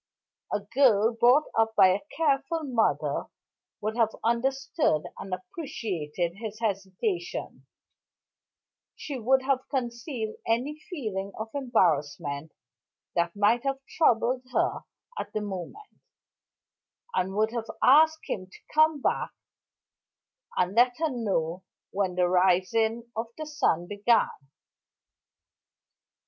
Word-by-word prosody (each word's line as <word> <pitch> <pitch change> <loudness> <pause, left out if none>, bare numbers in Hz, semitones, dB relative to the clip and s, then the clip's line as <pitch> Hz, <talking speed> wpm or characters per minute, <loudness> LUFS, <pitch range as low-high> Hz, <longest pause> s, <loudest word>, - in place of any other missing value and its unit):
A 205 - 0
girl 230 0 +3
brought 245 +6 +5
up 225 0 +2
by 190 -2 +7
a 185 +2 +1 0.2
careful 315 +1 +1
mother 245 -6 0 0.5
would 215 +1 -2
have 225 -2 +2
understood 260 - +1 0.2
and 190 - -7
appreciated 185 - -4
his 215 -1 -6
hesitation; 200 - -3 1.3
she 280 -4 -6
would 260 +3 +3
have 260 -1 0
concealed 240 -3 -3
any 255 +7 0
feeling 205 - -4
of 220 +1 -5
embarrassment 150 - 0 0.6
that 170 +1 0
might 210 +4 +3
have 275 -1 0 0.2
troubled 250 -4 +3
her - - +1 0.4
at - - -5
the 215 - -1
moment, 205 - -7 1.1
and 190 +1 -1
would 215 +1 +2
have 230 -1 -4
asked 315 +4 +6
him 185 -2 -4
to - - -14 0.2
come 310 -2 +4
back - - 0 1.3
and 180 +1 +1
let 245 +2 +4
her 320 -1 0
know 190 -7 -1 0.3
when 190 -2 -1
the 180 0 +3
rising 190 +6 +2
of 225 +1 -2
the 310 - -5
sun 285 - +1
began. 205 +5 +2
225 Hz, 115 wpm, -27 LUFS, 190-265 Hz, 1.3 s, by